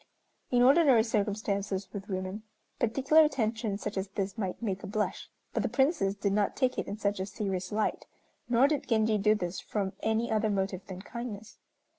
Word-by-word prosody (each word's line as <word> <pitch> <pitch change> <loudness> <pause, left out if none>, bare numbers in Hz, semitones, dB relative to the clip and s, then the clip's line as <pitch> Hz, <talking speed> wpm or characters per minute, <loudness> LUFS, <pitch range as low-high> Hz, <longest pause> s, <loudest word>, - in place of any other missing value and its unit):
In 245 -1 +4
ordinary 270 -3 +6
circumstances 200 -3 -1
with 200 0 -7
women, 185 +2 -3 0.4
particular 270 +7 +4
attention 225 -7 0
such 205 - -5
as 190 +1 -1
this 195 0 -3
might 195 -5 -3
make 195 -5 -2
a - - -7
blush, 210 +1 -2 0.2
but - - +1
the - - -1
Princess 265 - +2
did 200 0 -1
not 205 -1 +1
take 255 -2 +1
it - - -3
in 200 - -4
such 205 -2 -1
a 190 - -1
serious 195 -2 -3
light, 215 +1 -1 0.4
nor 245 +3 +5
did 295 -2 -1
Genji 220 -2 +2
do 210 +2 +4
this 180 -3 -3
from 200 -2 -3
any 220 +1 0
other 215 0 +2
motive 195 -2 -1
than 185 0 -7
kindness. 220 -3 -7
210 Hz, 185 wpm, -30 LUFS, 195-230 Hz, 0.4 s, ordinary